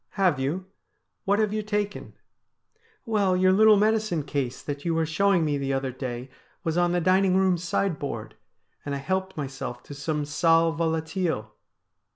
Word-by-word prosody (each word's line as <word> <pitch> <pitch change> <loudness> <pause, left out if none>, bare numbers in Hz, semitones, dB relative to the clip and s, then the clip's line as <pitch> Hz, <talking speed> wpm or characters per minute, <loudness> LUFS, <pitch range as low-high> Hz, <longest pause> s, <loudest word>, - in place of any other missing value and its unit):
' - - -54
Have 170 -7 +3
you? 155 +8 -2 0.6
What 200 +1 +3
have 215 -1 +1
you 215 - 0
taken? 205 -1 -3 0.3
' - - -53
' 445 -1 -37
Well, 200 -5 +2
your 185 0 +4
little 215 +1 +6
medicine 215 -6 +1
case 135 -3 -3
that 145 -1 -5
you 170 -2 0
were 165 0 +1
showing 175 +2 +2
me 145 -2 0
the 135 0 -1
other 135 -1 -1
day 125 0 -6 0.3
was 165 -3 -1
on 175 0 +2
the 175 - +1
dining 185 +2 +3
room 190 -1 +3
sideboard, 165 - -2 0.5
and 140 -1 -3
I - - -2
helped 190 +5 -2
myself 135 -4 -5
to - - -10
some 150 +1 -2
sal 165 +2 +3
volatile.' 160 - -2
165 Hz, 180 wpm, -26 LUFS, 145-195 Hz, 0.6 s, little